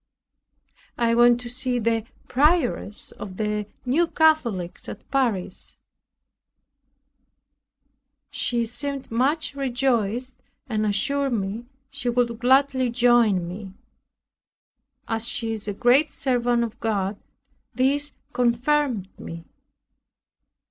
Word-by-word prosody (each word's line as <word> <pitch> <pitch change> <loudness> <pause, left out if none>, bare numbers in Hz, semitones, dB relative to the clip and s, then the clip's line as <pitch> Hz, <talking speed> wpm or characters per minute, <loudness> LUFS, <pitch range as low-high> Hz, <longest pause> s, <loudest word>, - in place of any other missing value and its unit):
I 230 -1 +2
went 240 0 +5
to 240 - -7
see 255 0 -1
the 225 -1 0 0.2
prioress 275 - +1
of 190 -3 -9
the 210 -1 -1 0.2
New 310 +7 +2
Catholics 305 - +1
at 210 - -9
Paris. 230 -9 -1 2.6
She 245 -5 0
seemed 275 +3 -5
much 280 +7 +1
rejoiced, 250 -2 -1 0.2
and 215 -3 -1
assured 275 +6 0
me 215 +3 -3 0.2
she 275 -3 -1
would 235 -1 0
gladly 260 0 +3
join 235 -7 +3
me. 190 +1 -8 1.3
As 225 +1 -1
she 225 -2 -2
is 215 -1 -4
a - - 0
great 250 +8 +3
servant 245 -2 +1
of 230 -2 -5
God, 205 -3 -1 0.6
this 285 +3 +1 0.2
confirmed 245 -2 +1
me. 165 0 -8
240 Hz, 100 wpm, -24 LUFS, 215-265 Hz, 2.6 s, went